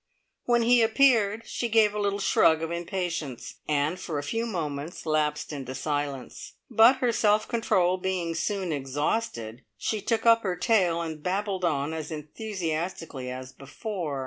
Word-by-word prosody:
When 240 Hz, -1 st, +3 dB
he 240 Hz, +1 st, +5 dB
appeared 225 Hz, -3 st, +3 dB
she 235 Hz, -, -3 dB
gave 215 Hz, -2 st, +4 dB
a 210 Hz, -, -3 dB
little 200 Hz, -1 st, 0 dB
shrug 165 Hz, -5 st, +3 dB
of 165 Hz, -, -3 dB
impatience, 170 Hz, -6 st, -4 dB
and 150 Hz, +4 st, 0 dB
for 160 Hz, -4 st, -4 dB
a 145 Hz, -, -2 dB
few 225 Hz, +10 st, -2 dB
moments 155 Hz, -5 st, -4 dB
lapsed 155 Hz, -1 st, 0 dB
into 130 Hz, -2 st, -6 dB
silence, 145 Hz, -2 st, -4 dB, 0.2 s
but 230 Hz, +3 st, +7 dB
her 250 Hz, -2 st, +1 dB
self 215 Hz, -1 st, +2 dB
control 185 Hz, -6 st, +2 dB
being 180 Hz, -2 st, -2 dB
soon 185 Hz, +2 st, -2 dB
exhausted, 135 Hz, -, -2 dB
she 215 Hz, -, -2 dB
took 225 Hz, +2 st, -1 dB
up 230 Hz, 0 st, +6 dB
her 185 Hz, -4 st, -1 dB
tale 180 Hz, -4 st, +2 dB
and 160 Hz, -2 st, -6 dB
babbled 190 Hz, +2 st, -2 dB
on 150 Hz, -2 st, 0 dB
as 160 Hz, -2 st, -5 dB
enthusiastically 160 Hz, -, -4 dB
as 130 Hz, +1 st, -7 dB
before. 150 Hz, -, -5 dB
175 Hz, 155 wpm, -27 LUFS, 150-215 Hz, 0.2 s, but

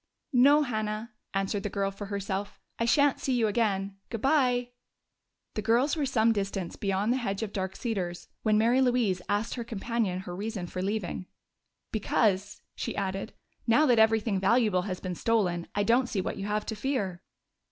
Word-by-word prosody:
"No, 285 Hz, +4 st, +6 dB
Hannah," 215 Hz, -2 st, -3 dB, 0.2 s
answered 195 Hz, +1 st, 0 dB
the 210 Hz, -, -3 dB
girl 195 Hz, 0 st, -1 dB
for 195 Hz, +1 st, -7 dB
herself. 200 Hz, 0 st, -3 dB, 0.2 s
"I 230 Hz, -, +2 dB
shan't 285 Hz, +3 st, +4 dB
see 265 Hz, -, -1 dB
you 240 Hz, -2 st, +3 dB
again. 200 Hz, -3 st, 0 dB
Good 230 Hz, -, -4 dB
bye." 250 Hz, -4 st, +2 dB, 0.8 s
The 215 Hz, -, -2 dB
girls 240 Hz, +8 st, +2 dB
were 295 Hz, -3 st, 0 dB
some 230 Hz, -3 st, +3 dB
distance 195 Hz, -4 st, -2 dB
beyond 200 Hz, +3 st, 0 dB
the -, -, 0 dB
hedge 210 Hz, -4 st, -2 dB
of 205 Hz, -, -5 dB
Dark 190 Hz, -1 st, -3 dB
Cedars 185 Hz, -7 st, -3 dB
when 215 Hz, -1 st, +3 dB
Mary 235 Hz, +4 st, +4 dB
Louise 240 Hz, -8 st, +2 dB
asked 205 Hz, +2 st, 0 dB
her 240 Hz, -, -4 dB
companion 225 Hz, -4 st, -2 dB
her 180 Hz, -2 st, -7 dB
reason 205 Hz, -1 st, -4 dB
for 185 Hz, +1 st, -5 dB
leaving. 190 Hz, -2 st, -2 dB, 0.6 s
"Because," 205 Hz, -2 st, 0 dB
she -, -, -4 dB
added, 195 Hz, +1 st, -3 dB, 0.3 s
"now 265 Hz, +7 st, +5 dB
that 245 Hz, -5 st, +4 dB
everything 220 Hz, -2 st, +3 dB
valuable 210 Hz, -1 st, +3 dB
has 185 Hz, -, -3 dB
been 185 Hz, -1 st, -4 dB
stolen, 180 Hz, -4 st, 0 dB
I 205 Hz, -, +2 dB
don't 240 Hz, +3 st, +3 dB
see 200 Hz, -, -1 dB
what 185 Hz, -, -2 dB
you 195 Hz, -, -4 dB
have 210 Hz, 0 st, -1 dB
to 220 Hz, -, -3 dB
fear." 210 Hz, -7 st, -2 dB
215 Hz, 180 wpm, -29 LUFS, 195-235 Hz, 0.8 s, No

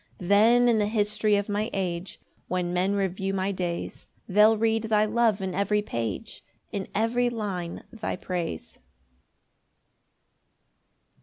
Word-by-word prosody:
5 180 Hz, -, -8 dB
Then 230 Hz, +4 st, +5 dB
in 230 Hz, -2 st, +4 dB
the 205 Hz, -, +2 dB
history 210 Hz, 0 st, +1 dB
of 205 Hz, 0 st, 0 dB
my 210 Hz, +1 st, -1 dB
age, 180 Hz, -1 st, -3 dB, 0.3 s
When 180 Hz, -1 st, -1 dB
men 185 Hz, +3 st, +1 dB
review 195 Hz, 0 st, -1 dB
my 190 Hz, +1 st, 0 dB
days, 175 Hz, -3 st, -4 dB, 0.2 s
They'll 210 Hz, +3 st, +5 dB
read 225 Hz, 0 st, +1 dB
thy 215 Hz, -1 st, +3 dB
love 220 Hz, -2 st, +2 dB
in 190 Hz, -1 st, -3 dB
every 205 Hz, +2 st, +1 dB
page, 115 Hz, -, -4 dB, 0.3 s
In 195 Hz, -2 st, -4 dB
every 240 Hz, +3 st, +2 dB
line 195 Hz, -7 st, -4 dB
thy 225 Hz, -2 st, -3 dB
praise. 170 Hz, -, -5 dB
205 Hz, 135 wpm, -26 LUFS, 185-220 Hz, 0.3 s, Then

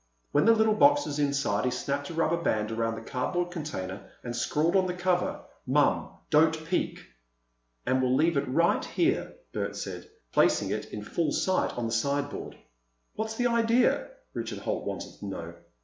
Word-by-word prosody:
When 145 Hz, -, +3 dB
the 230 Hz, 0 st, +7 dB
little 220 Hz, -1 st, +4 dB
box 290 Hz, +6 st, +5 dB
was 145 Hz, 0 st, -3 dB
inside, 140 Hz, -8 st, +1 dB
he 130 Hz, -, +2 dB
snapped 140 Hz, +3 st, -2 dB
a 170 Hz, -, -6 dB
rubber 165 Hz, +1 st, +1 dB
band 105 Hz, -8 st, 0 dB
around 115 Hz, 0 st, -1 dB
the 115 Hz, 0 st, -9 dB
cardboard 175 Hz, +7 st, -1 dB
container 105 Hz, -, -5 dB
and 120 Hz, -1 st, -4 dB
scrawled 155 Hz, +8 st, +1 dB
on 190 Hz, -1 st, +4 dB
the 180 Hz, -, -2 dB
cover 180 Hz, 0 st, 0 dB, 0.3 s
"Mom—Don't 160 Hz, +1 st, +2 dB
peek!" 175 Hz, +2 st, -1 dB, 0.8 s
"And 130 Hz, 0 st, +2 dB
we'll 130 Hz, 0 st, +2 dB
leave 160 Hz, +4 st, +3 dB
it 140 Hz, 0 st, 0 dB
right 170 Hz, +7 st, +2 dB
here," 345 Hz, +2 st, 0 dB, 0.2 s
Bert -, -, -2 dB
said, -, -, -6 dB, 0.2 s
placing -, -, +3 dB
it -, -, -2 dB
in -, -, -6 dB
full 165 Hz, -4 st, -1 dB
sight 185 Hz, -8 st, +1 dB
on 120 Hz, -, -1 dB
the 115 Hz, -, -2 dB
sideboard. 140 Hz, +5 st, -1 dB, 0.6 s
"What's 220 Hz, +1 st, -3 dB
the 245 Hz, -, 0 dB
idea?" 235 Hz, +1 st, +3 dB, 0.3 s
Richard -, -, -4 dB
Holt -, -, -3 dB
wanted -, -, -5 dB
to -, -, -7 dB
know. -, -, -6 dB
155 Hz, 175 wpm, -28 LUFS, 130-185 Hz, 0.8 s, the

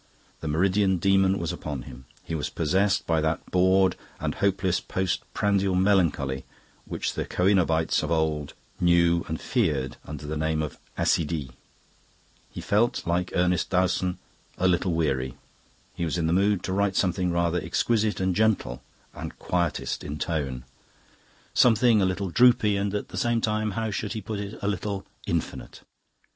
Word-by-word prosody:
The -, -, -5 dB
meridian 95 Hz, +4 st, +2 dB
demon 95 Hz, +1 st, +3 dB
was 85 Hz, -3 st, -3 dB
upon 70 Hz, -5 st, -5 dB
him; 65 Hz, +1 st, -11 dB, 0.2 s
he -, -, -6 dB
was 75 Hz, -2 st, -2 dB
possessed 95 Hz, +5 st, +1 dB
by 80 Hz, -1 st, +1 dB
that 80 Hz, +1 st, -1 dB
bored 95 Hz, 0 st, +4 dB, 0.2 s
and 75 Hz, -1 st, -2 dB
hopeless 95 Hz, -2 st, +1 dB
post 95 Hz, -1 st, -2 dB
prandial 100 Hz, -2 st, +1 dB
melancholy 85 Hz, -9 st, +2 dB, 0.4 s
which -, -, -3 dB
the -, -, -2 dB
coenobites 90 Hz, -4 st, +2 dB
of -, -, -3 dB
old 80 Hz, -3 st, -1 dB, 0.2 s
knew 85 Hz, -1 st, +3 dB
and 80 Hz, 0 st, -3 dB
feared 65 Hz, -5 st, 0 dB
under 75 Hz, 0 st, -8 dB
the 75 Hz, +1 st, -3 dB
name 80 Hz, 0 st, 0 dB
of 75 Hz, -, -6 dB, 0.2 s
"accidie." 75 Hz, -5 st, 0 dB, 1.0 s
He -, -, -7 dB
felt, 105 Hz, +2 st, +1 dB
like 90 Hz, +1 st, -1 dB
Ernest 90 Hz, -1 st, +1 dB
Dowson, 90 Hz, 0 st, +1 dB, 0.4 s
"a 95 Hz, -, +2 dB
little 90 Hz, 0 st, +1 dB
weary." 65 Hz, -6 st, 0 dB, 0.6 s
He -, -, -4 dB
was 85 Hz, +1 st, -1 dB
in 85 Hz, -, 0 dB
the 80 Hz, -, +1 dB
mood 100 Hz, 0 st, +2 dB
to 95 Hz, -, -2 dB
write 100 Hz, 0 st, +1 dB
something 90 Hz, -1 st, +1 dB
rather 85 Hz, 0 st, +1 dB
exquisite 105 Hz, +6 st, 0 dB
and 95 Hz, -1 st, 0 dB
gentle 110 Hz, -, +1 dB, 0.3 s
and -, -, -7 dB
quietist 85 Hz, -3 st, -1 dB
in 75 Hz, +1 st, -5 dB
tone; 70 Hz, -7 st, -2 dB, 0.9 s
something 115 Hz, -2 st, +5 dB
a -, -, +3 dB
little 95 Hz, 0 st, -2 dB
droopy 120 Hz, -2 st, +5 dB
and 100 Hz, +1 st, -1 dB
at 105 Hz, -, -3 dB
the -, -, -7 dB
same 120 Hz, -1 st, +1 dB
time 110 Hz, -1 st, -1 dB
how 110 Hz, -1 st, -1 dB
should 105 Hz, +1 st, -3 dB
he 110 Hz, -, -4 dB
put 105 Hz, +1 st, -5 dB
it? 100 Hz, +1 st, -6 dB
a -, -, 0 dB
little 100 Hz, 0 st, -2 dB, 0.2 s
infinite. 85 Hz, -2 st, -3 dB
90 Hz, 160 wpm, -26 LUFS, 80-100 Hz, 1.0 s, something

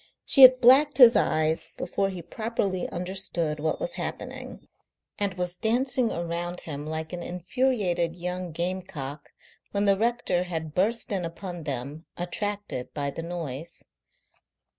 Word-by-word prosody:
She 275 Hz, -, +6 dB
had 255 Hz, -1 st, +10 dB
blacked 270 Hz, +4 st, +6 dB
his 245 Hz, -3 st, +9 dB
eyes 155 Hz, +1 st, +1 dB
before 195 Hz, -1 st, -1 dB
he 180 Hz, -3 st, -7 dB
properly 200 Hz, -1 st, -2 dB
understood 175 Hz, -4 st, -2 dB
what 155 Hz, +1 st, -1 dB
was -, -, -3 dB
happening, -, -, -6 dB, 0.5 s
and 200 Hz, -2 st, 0 dB
was 180 Hz, 0 st, -3 dB
dancing 245 Hz, +2 st, +1 dB
around 170 Hz, +1 st, -3 dB
him 145 Hz, -1 st, -6 dB
like 160 Hz, +1 st, -4 dB
an 175 Hz, -, -4 dB
infuriated 180 Hz, -2 st, 0 dB
young 180 Hz, 0 st, -4 dB
gamecock 170 Hz, -5 st, -4 dB, 0.4 s
when 200 Hz, 0 st, +1 dB
the 200 Hz, -1 st, +5 dB
rector 230 Hz, -6 st, +1 dB
had 160 Hz, -3 st, -4 dB
burst 220 Hz, +6 st, +1 dB
in 190 Hz, -3 st, -1 dB
upon 170 Hz, 0 st, -6 dB
them, 140 Hz, +3 st, -5 dB
attracted 200 Hz, -6 st, -4 dB
by 140 Hz, -1 st, -2 dB
the 165 Hz, -, -6 dB
noise. 165 Hz, -2 st, -5 dB
180 Hz, 140 wpm, -27 LUFS, 165-205 Hz, 0.5 s, had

